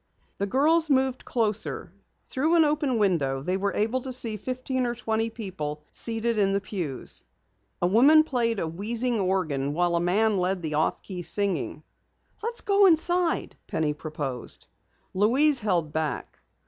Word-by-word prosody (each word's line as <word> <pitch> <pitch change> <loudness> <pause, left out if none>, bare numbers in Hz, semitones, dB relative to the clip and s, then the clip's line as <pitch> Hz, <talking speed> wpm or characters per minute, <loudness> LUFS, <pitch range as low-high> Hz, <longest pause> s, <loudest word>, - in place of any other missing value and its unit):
The 200 - 0
girls 310 +8 +3
moved 265 -2 +1
closer. 210 - -2 0.3
Through 310 +6 +1
an 325 -2 +5
open 295 -4 0
window 145 -10 +1
they 180 +4 -1
were 200 +1 -1
able 225 +5 0
to 260 - -6
see 235 -3 0
fifteen 255 +3 -2
or 240 - -2
twenty 225 -1 -1
people 165 -10 -6
seated 230 -1 0
in 195 -1 +2
the 200 - +2
pews. 175 - -4 0.6
A - - +5
woman 270 - +6
played 240 -6 -1
a 165 - -2
wheezing 225 +7 -1
organ 155 -7 -1
while 175 0 +1
a 170 - +1
man 205 +4 +2
led 180 0 -1
the 155 -1 -3
off 155 +1 0
key 185 -3 -6
singing. 185 -5 -2 0.6
"Let's 465 +2 -3
go 400 -2 +4
inside," 345 +1 +2
Penny 155 -2 -1
proposed. 145 -5 -6 0.5
Louise 255 +9 +4
held 175 -8 -1
back. 155 -3 -3
210 Hz, 155 wpm, -26 LUFS, 175-255 Hz, 0.6 s, woman